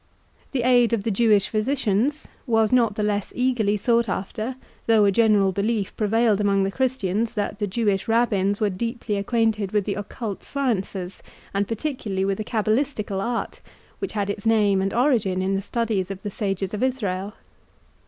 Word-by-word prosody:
The 255 -4 -1
aid 245 -2 +4
of 215 -4 0
the 225 - 0
Jewish 210 -2 +3
physicians 245 +3 0 0.2
was 225 -2 +3
not 235 -4 +3
the 210 - -1
less 205 -1 -1
eagerly 245 -5 +1
sought 235 +1 +2
after, 215 +6 -3 0.3
though 220 -2 +5
a 200 - +4
general 205 -2 +4
belief 205 +1 -1
prevailed 215 -1 +2
among 200 -1 +2
the 195 - -1
Christians, 230 -4 -1
that 205 0 -2
the 205 - 0
Jewish 200 -1 0
Rabbins 205 -4 +2
were 210 -2 +1
deeply 230 +2 -3
acquainted 215 -1 0
with 210 -1 +2
the 205 - -1
occult 205 0 -5
sciences, 195 -9 -3 0.3
and 200 0 0
particularly 225 -6 -2
with 195 +1 -1
the - - -1
cabalistical 215 -2 -1
art, 235 +2 -3 0.4
which 390 - -4
had 205 -1 -1
its 205 +2 -5
name 205 -3 +3
and 195 +1 0
origin 230 -7 +2
in 190 +1 0
the 195 - 0
studies 210 -3 -1
of 195 -1 -7
the 205 - -4
sages 195 -1 -2
of 210 - -3
Israel. 205 -7 -1
210 Hz, 175 wpm, -24 LUFS, 195-235 Hz, 0.4 s, though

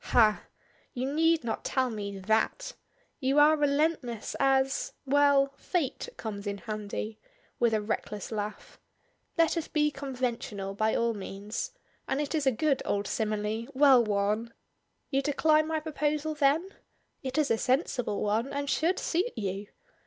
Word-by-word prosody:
"Hah! 215 -3 +4 0.5
You 260 +3 -2
need 325 -1 +3
not 230 - -3
tell 260 -2 0
me 200 -2 -5
that. 220 - 0 0.5
You 270 0 +1
are 300 +1 +7
relentless 290 -5 0
as 270 0 +2
well, 280 0 +4
'Fate' 335 - -2
comes 205 -2 -5
in 200 0 -2
handy," 215 0 -5 0.4
with 235 -1 +3
a 215 - 0
reckless 210 -1 -4
laugh. 210 -1 -5 0.6
"Let 330 +1 +3
us 325 - -2
be 300 -1 +1
conventional 245 -8 -3
by 215 +2 +1
all 235 0 +1
means, 205 - -5 0.4
and 270 - 0
it 295 +1 -2
is 300 -4 0
a - - +6
good 275 +4 +1
old 200 0 -1
simile, 215 +1 -2
well 265 -3 +7
worn! 210 +2 -1 0.6
You 275 0 +2
decline 305 +2 +3
my 320 0 0
proposal 305 0 -1
then? 300 +5 +2 0.5
It 260 +1 -4
is 300 -4 +2
a 225 - +3
sensible 250 -4 0
one, 220 +6 0
and 285 0 -2
should 330 +6 +1
suit 365 +8 0
you. 200 0 -3
260 Hz, 150 wpm, -29 LUFS, 215-295 Hz, 0.6 s, are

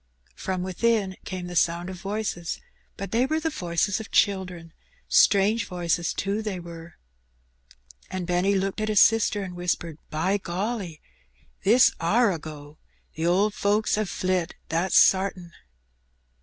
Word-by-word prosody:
Prom 185 -1 -3
within 195 +1 0
came 185 -1 -5
the 175 0 -7
sound 170 +1 +1
of 190 - -6
voices, 195 -2 -4 0.4
but 195 -1 -6
they 240 +3 +2
were 315 +2 0
the 320 0 -2
voices 175 - -1
of 220 - -8
children 180 -5 0 0.2
— - - -34
strange 205 +2 +4
voices, 175 -1 -1
too, 200 +3 -2
they 210 -4 -4
were. 170 -1 -10 1.1
And 185 -1 -4
Benny 180 +3 +1
looked 195 +2 -1
at 215 - -1
his 210 -2 +4
sister 215 -2 +4
and 180 -2 -7
whispered 175 -3 -3
— - - -39
" - - -42
By 195 +5 +1
golly! 190 -2 -4 0.6
this 235 +6 +6
are 205 +6 +3
a 165 - -5
go. 150 -1 -10 0.3
The 160 +2 -2
owd 200 +4 +2
folks 210 +2 +1
'ave 215 0 0
flit, 185 -1 -1
that's 170 +3 +1
sartin." 190 -2 +3
185 Hz, 155 wpm, -25 LUFS, 175-210 Hz, 1.1 s, this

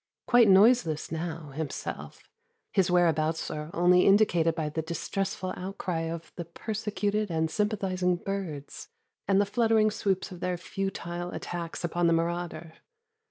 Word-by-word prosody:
Quite 240 -2 +6
noiseless 190 -5 +4
now, 165 -1 -4
himself, 145 0 -6 0.4
his 190 -2 +2
whereabouts 165 -2 +2
are 150 0 -5
only 180 +1 +4
indicated 175 -5 +4
by 160 -2 -2
the 160 +2 -2
distressful 185 +3 -3
outcry 180 -3 -3
of 165 -1 -7
the 170 - -4
persecuted 210 +2 -2
and 160 -1 0
sympathizing 190 -3 0
birds 175 -6 -5 0.4
and 195 0 +4
the 205 - +3
fluttering 220 0 +3
swoops 195 -2 -1
of 180 - -9
their 180 0 -1
futile 175 -2 -4
attacks 175 -1 -5
upon 175 0 +1
the 165 - +4
marauder. 170 -1 -2
175 Hz, 135 wpm, -28 LUFS, 165-195 Hz, 0.4 s, Quite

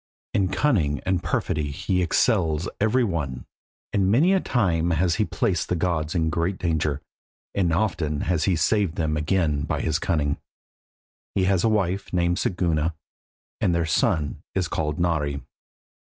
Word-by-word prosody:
In 95 -2 +2
cunning 90 - +1
and 95 -1 +1
perfidy 75 -4 -1
he 90 +6 -1
excels 85 -3 +2
every 110 +5 +3
one, 75 - -3 0.5
and 95 -2 +2
many 160 - +4
a 190 - +4
time 90 - +1
has 85 +1 +1
he 110 - +2
placed 105 -6 -1
the 90 - +1
gods 80 -2 -1
in 80 -2 +1
great 85 +3 -1
danger, 75 -4 -1 0.5
and 90 -4 +1
often 80 -5 0
has 85 -4 0
he 95 - +2
saved 90 +2 +1
them 80 -2 0
again 75 -1 +1
by - - -2
his 80 0 0
cunning. 75 -6 0 1.0
He 95 - +2
has 95 -1 +2
a 115 - +4
wife 100 -2 0
named 85 -1 +1
Siguna, 85 -3 0 0.6
and 85 - +2
their 85 -1 +1
son 80 -1 0
is 95 -3 +1
called 75 -2 -2
Nari. 75 -5 0
85 Hz, 155 wpm, -24 LUFS, 80-95 Hz, 1.0 s, many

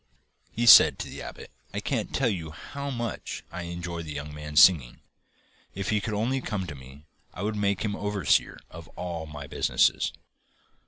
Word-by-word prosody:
He 120 - -1
said 120 - +9
to - - -5
the - - -8
abbot: - - -9 0.2
'I - - 0
can't - - -2
tell - - +1
you 85 -6 -2
how 140 - -7
much 120 -4 -5
I 90 -1 -6
enjoy 85 -1 -5
that 80 -2 -7
young 75 +1 -6
man's 75 0 0
singing. 75 -11 +5 0.7
If 100 0 -3
he 105 -1 +1
could 105 +1 -3
only 125 +6 0
come 100 -6 -3
to 80 - -7
me 70 +2 -14 0.3
I 90 - -5
would 105 +1 -1
make 100 -2 0
him 100 -1 -2
overseer 105 -2 0
of - - -10
all 85 -3 -5
my 75 -2 -8
business. - - +1
90 Hz, 180 wpm, -27 LUFS, 75-105 Hz, 0.7 s, said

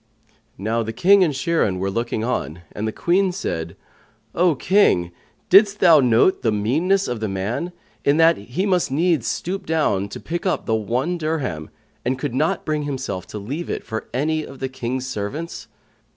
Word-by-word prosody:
Now 110 +4 -1
the 110 0 -4
King 195 - +5
and 165 - +2
Shirin 145 - 0
were 95 +1 -2
looking 115 0 -2
on, 85 -8 -2
and 105 +1 -4
the - - -1
Queen 185 - +1
said, 85 - -4 0.6
"O 175 -2 +3
King, 130 - +3 0.4
didst 200 +1 +6
thou 165 -4 +7
note 125 +7 +3
the 115 - +1
meanness 155 - +1
of 120 -2 -3
the 110 - -2
man, 100 - -3 0.3
in 140 +2 +3
that 165 0 +6
he 125 - -3
must 185 -3 +1
needs 155 -3 +1
stoop 190 +2 -3
down 105 -12 +1
to - - -7
pick 175 +1 -4
up 185 - -1
the 110 - 0
one 125 - -1
dirham, 145 - -3 0.3
and 130 +2 0
could 130 -1 -3
not 150 +5 0
bring 155 -1 -1
himself 130 -10 -4
to - - -7
leave 135 +12 -5
it - - -3
for 110 -1 -6
any 155 +5 0
of 135 -2 -10
the 130 0 -3
King's 130 0 -4
servants?" 130 +8 -5
135 Hz, 180 wpm, -22 LUFS, 110-170 Hz, 0.6 s, thou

